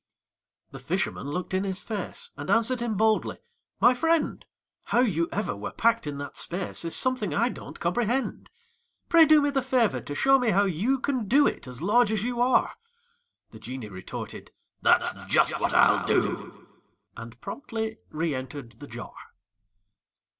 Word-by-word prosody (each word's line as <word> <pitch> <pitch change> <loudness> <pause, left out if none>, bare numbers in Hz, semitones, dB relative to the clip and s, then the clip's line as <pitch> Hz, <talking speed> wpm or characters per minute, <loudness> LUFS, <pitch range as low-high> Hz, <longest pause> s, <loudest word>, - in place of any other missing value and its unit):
The - - -9
fisherman 140 - -2
looked 180 +5 -4
in 190 +1 +1
his 190 0 -2
face, 210 -4 -5
And 145 +1 -7
answered 230 +2 +2
him 235 -3 -2
boldly: 220 +1 +2 0.4
"My 245 - +6
friend, 325 +5 0 0.4
How 240 - +2
you 170 -9 +1
ever 210 - -2
were - - -6
packed 230 -6 +2
in 145 -1 -4
that 145 - -7
space 180 0 -3
Is 165 - -1
something 235 - 0
I 235 +7 +2
don't - - -9
comprehend. 240 +9 -1 0.6
Pray 335 -2 +7
do 305 -1 +6
me 290 - +1
the 270 -1 +1
favor 255 -4 +1
to 145 - -6
show 270 - +4
me 245 -2 +1
how 200 0 +3
you 200 - +1
Can 260 -4 -2
do 280 +7 +5
it, - - -2
as 125 +4 -9
large 215 +3 +4
as 215 -2 -1
you 240 0 -2
are." 250 +1 +3 0.8
The - - -12
genie 125 -4 -7
retorted: 95 -2 -8 0.3
"That's - - +2
just - - +2
what - - +1
I'll - - +5
do!" - - -1 0.5
And 115 +1 -10
promptly 225 - -5
reëntered 135 -6 -4
the 145 - -9
jar. 120 -1 -9
215 Hz, 165 wpm, -26 LUFS, 155-250 Hz, 0.8 s, Pray